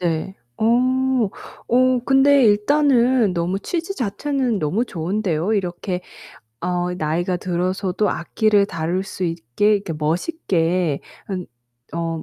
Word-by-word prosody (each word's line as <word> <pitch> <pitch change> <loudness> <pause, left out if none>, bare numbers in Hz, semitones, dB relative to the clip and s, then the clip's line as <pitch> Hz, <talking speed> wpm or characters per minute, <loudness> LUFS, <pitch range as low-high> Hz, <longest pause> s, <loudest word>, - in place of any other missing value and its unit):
네. 170 +2 -2 0.2
어 - - -1 1.0
어 255 +1 +3
근데 275 +1 +5
일단은 240 0 +3
너무 175 +3 -1
취지 340 - -3
자체는 250 - -1
너무 185 +10 0
좋은데요. 180 0 -1
이렇게 180 -2 -2 0.6
어 180 0 -1
나이가 175 +2 -1
들어서도 185 +3 -1
악기를 205 +3 +2
다룰 170 +1 -2
수 190 - -5
있게 170 - +1
이렇게 195 -4 -5
멋있게 170 - 0 0.3
으 185 -2 -3 0.5
어 165 -1 -2
190 Hz, 235 characters per minute, -21 LUFS, 170-230 Hz, 1.0 s, 근데